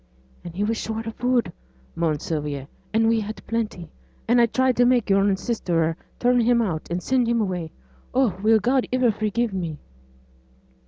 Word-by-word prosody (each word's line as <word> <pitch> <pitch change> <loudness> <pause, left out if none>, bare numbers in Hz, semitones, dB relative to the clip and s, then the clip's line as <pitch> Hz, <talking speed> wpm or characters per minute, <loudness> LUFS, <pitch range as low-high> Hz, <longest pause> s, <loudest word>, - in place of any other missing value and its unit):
'And 170 -1 -9
he 200 - -1
was 225 +2 0
short 225 0 -4
o' - - -2
food,' 245 +1 0 0.4
moaned 160 -3 -1
Sylvia, 145 -4 -3 0.2
'and 225 +1 +3
we 225 0 +3
had 215 +1 -6
plenty, 215 -8 -3 0.4
and 240 +1 +5
I 235 - +5
tried 260 +2 +1
to 245 - +5
make 245 -4 +2
yo'r 195 0 +4
sister 170 -7 -1 0.2
turn 245 0 +3
him 235 +1 +3
out, 180 -9 -2
and 175 +1 -3
send 255 -2 +2
him 235 0 +2
away. 180 -6 -2 0.4
Oh! 250 -7 +2
will 220 +1 +5
God 250 +5 +1
iver 250 -2 +3
forgive 215 +1 -1
me?' 170 -5 -3
220 Hz, 175 wpm, -23 LUFS, 180-240 Hz, 0.4 s, and